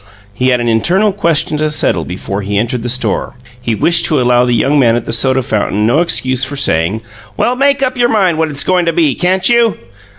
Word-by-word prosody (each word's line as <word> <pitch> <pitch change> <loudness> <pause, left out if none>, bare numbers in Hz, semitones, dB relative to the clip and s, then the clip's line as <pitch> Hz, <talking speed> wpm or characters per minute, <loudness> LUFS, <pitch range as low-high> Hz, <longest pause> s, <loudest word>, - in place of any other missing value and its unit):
He 125 +5 -1
had 125 -1 +2
an 120 - -2
internal 180 - +1
question 165 -6 -1
to 155 0 0
settle 90 - +1
before 95 +2 -5
he 100 +1 -3
entered 120 +3 -2
the 120 - -4
store: 130 +2 -2 0.3
he 115 -2 -2
wished 170 - +2
to 155 -4 +1
allow 125 0 +2
the 125 - 0
young 135 +6 +1
man 115 -3 +3
at 120 - -3
the - - -4
soda 130 +2 +1
fountain 105 -1 -1
no 120 +8 +2
excuse 130 -6 0
for 140 +2 -4
saying, 100 -4 0 0.3
"Well, 245 - 0
make 280 +1 +1
up 255 -1 -2
your 240 0 +2
mind 185 -8 +1
what 160 -1 0
it's 145 -1 -1
goin' 180 -1 +1
to 165 - 0
be, 155 -4 +1
can't 185 +6 0
you?" 235 -6 +2
135 Hz, 230 wpm, -13 LUFS, 115-175 Hz, 0.3 s, man